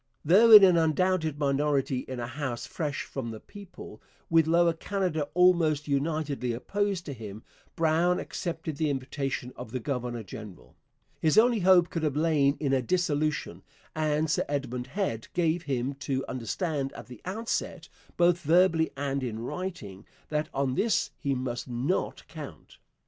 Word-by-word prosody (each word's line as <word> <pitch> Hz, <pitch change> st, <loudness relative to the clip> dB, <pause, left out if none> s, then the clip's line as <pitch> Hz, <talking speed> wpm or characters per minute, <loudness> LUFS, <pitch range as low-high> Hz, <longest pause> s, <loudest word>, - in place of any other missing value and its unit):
Though 200 Hz, +9 st, +6 dB
in 215 Hz, -2 st, +11 dB
an 180 Hz, -3 st, +6 dB
undoubted 160 Hz, -1 st, +1 dB
minority 140 Hz, -2 st, +1 dB
in 130 Hz, -1 st, -5 dB
a 120 Hz, -, -3 dB
House 125 Hz, -1 st, -4 dB
fresh 150 Hz, -5 st, -3 dB
from 130 Hz, -4 st, -5 dB
the 110 Hz, -1 st, -7 dB
people, 195 Hz, -, -12 dB, 0.3 s
with 165 Hz, -1 st, +5 dB
Lower 170 Hz, +1 st, +4 dB
Canada 170 Hz, -4 st, -2 dB
almost 170 Hz, -5 st, +3 dB
unitedly 140 Hz, -3 st, -1 dB
opposed 195 Hz, -, -2 dB
to 145 Hz, -, -5 dB
him, 110 Hz, -3 st, -9 dB, 0.3 s
Brown 165 Hz, +2 st, +2 dB
accepted 160 Hz, -3 st, -5 dB
the 155 Hz, -1 st, +1 dB
invitation 135 Hz, -1 st, -3 dB
of -, -, -8 dB
the 130 Hz, -, -3 dB
governor 125 Hz, -3 st, -3 dB
general. 90 Hz, -, -11 dB, 0.4 s
His 160 Hz, +5 st, +2 dB
only 235 Hz, 0 st, +5 dB
hope 180 Hz, -2 st, +5 dB
could 165 Hz, -, -2 dB
have 150 Hz, -3 st, 0 dB
lain 150 Hz, -3 st, +2 dB
in 140 Hz, -3 st, 0 dB
a 130 Hz, -, +3 dB
dissolution, 150 Hz, -, -1 dB, 0.3 s
and 155 Hz, 0 st, +1 dB
Sir 150 Hz, -, +1 dB
Edmund 130 Hz, -3 st, -3 dB
Head 135 Hz, -, -3 dB
gave 170 Hz, -1 st, +1 dB
him 130 Hz, +1 st, -1 dB
to 135 Hz, -2 st, -2 dB
understand 135 Hz, -, -2 dB
at -, -, -9 dB
the 125 Hz, -3 st, -12 dB
outset, 220 Hz, +5 st, -3 dB, 0.3 s
both 175 Hz, 0 st, +4 dB
verbally 165 Hz, 0 st, +3 dB
and 140 Hz, 0 st, -2 dB
in 120 Hz, -4 st, -3 dB
writing, 115 Hz, -, -6 dB, 0.2 s
that 150 Hz, 0 st, -1 dB
on 135 Hz, -1 st, -1 dB
this 220 Hz, -, +1 dB
he 140 Hz, -2 st, -1 dB
must 125 Hz, -1 st, -4 dB
not 125 Hz, +9 st, -2 dB
count. -, -, -10 dB
150 Hz, 155 wpm, -28 LUFS, 130-170 Hz, 0.4 s, in